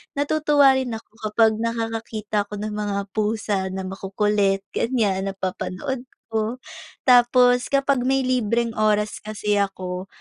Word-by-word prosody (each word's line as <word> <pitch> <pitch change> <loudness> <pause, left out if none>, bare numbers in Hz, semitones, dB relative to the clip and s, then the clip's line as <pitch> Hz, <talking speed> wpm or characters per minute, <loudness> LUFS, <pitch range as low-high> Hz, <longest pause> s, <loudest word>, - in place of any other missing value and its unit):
natutuwa 285 -2 +4
rin 245 -3 -3
ako 220 - -11 0.2
kapag 220 0 +3
nakakakita 225 -2 -2
ako 210 - -7
ng 210 +1 -4
mga 205 -1 -2
pusa 215 -1 -1
na 190 0 -4
makukulit 195 +1 0
ganyan, 205 -6 0
napapanood 195 +7 -4 0.2
ko. 220 +1 -1 0.5
Tapos 245 0 +5
kapag 275 -1 +2
may 270 0 +2
libreng 235 -2 +1
oras 210 0 +1
kasi 210 -1 -1
ako, 185 -1 -3
215 Hz, 125 wpm, -23 LUFS, 205-245 Hz, 0.5 s, Tapos